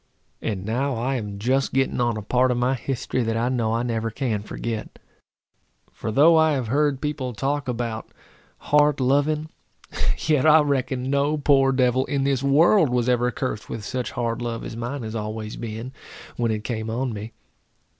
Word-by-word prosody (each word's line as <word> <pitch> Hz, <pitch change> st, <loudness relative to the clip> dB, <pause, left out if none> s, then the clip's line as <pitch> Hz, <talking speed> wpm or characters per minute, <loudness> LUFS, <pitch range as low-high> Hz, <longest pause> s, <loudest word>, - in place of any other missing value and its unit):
And 100 Hz, -4 st, -3 dB
now 130 Hz, +5 st, -1 dB
I 125 Hz, +4 st, -1 dB
am 105 Hz, -3 st, -5 dB
just 130 Hz, +6 st, 0 dB
getting 135 Hz, -1 st, +1 dB
on 120 Hz, -2 st, +1 dB
a 105 Hz, -, -5 dB
part 125 Hz, +4 st, +2 dB
of 125 Hz, -, +1 dB
my 125 Hz, +2 st, +2 dB
history 130 Hz, 0 st, -2 dB
that 115 Hz, -1 st, -1 dB
I 120 Hz, +2 st, +1 dB
know 115 Hz, -3 st, 0 dB
I 115 Hz, -, 0 dB
never 115 Hz, -2 st, -1 dB
can 115 Hz, -3 st, -2 dB
forget. 110 Hz, +1 st, -5 dB, 0.9 s
For 110 Hz, -, -5 dB
though 150 Hz, +8 st, +6 dB
I 160 Hz, -1 st, +4 dB
have 130 Hz, -5 st, -2 dB
heard 145 Hz, 0 st, +1 dB
people 145 Hz, -4 st, -3 dB
talk 140 Hz, +4 st, -2 dB
about 115 Hz, -2 st, -3 dB, 0.5 s
hard 150 Hz, -1 st, +3 dB
loving, 145 Hz, +4 st, +1 dB, 0.8 s
yet 150 Hz, -2 st, +3 dB
I 155 Hz, 0 st, +7 dB
reckon 135 Hz, -2 st, -1 dB
no 140 Hz, +2 st, +1 dB
poor 135 Hz, -2 st, +4 dB
devil 130 Hz, 0 st, +2 dB
in 140 Hz, -1 st, -1 dB
this 135 Hz, -2 st, +1 dB
world 155 Hz, +5 st, +4 dB
was 125 Hz, -1 st, 0 dB
ever 125 Hz, 0 st, +2 dB
cursed 120 Hz, -3 st, -4 dB
with 110 Hz, -2 st, -5 dB
such 125 Hz, 0 st, -3 dB
hard 115 Hz, 0 st, -2 dB
love 120 Hz, -1 st, -3 dB
as -, -, -6 dB
mine 120 Hz, +3 st, -4 dB
has 110 Hz, 0 st, -5 dB
always 110 Hz, 0 st, -4 dB
been, 115 Hz, +2 st, -6 dB, 0.4 s
when 120 Hz, -1 st, 0 dB
it 110 Hz, -1 st, -2 dB
came 110 Hz, -2 st, -3 dB
on 120 Hz, +2 st, -2 dB
me. 110 Hz, +2 st, -7 dB
125 Hz, 185 wpm, -24 LUFS, 115-140 Hz, 0.9 s, I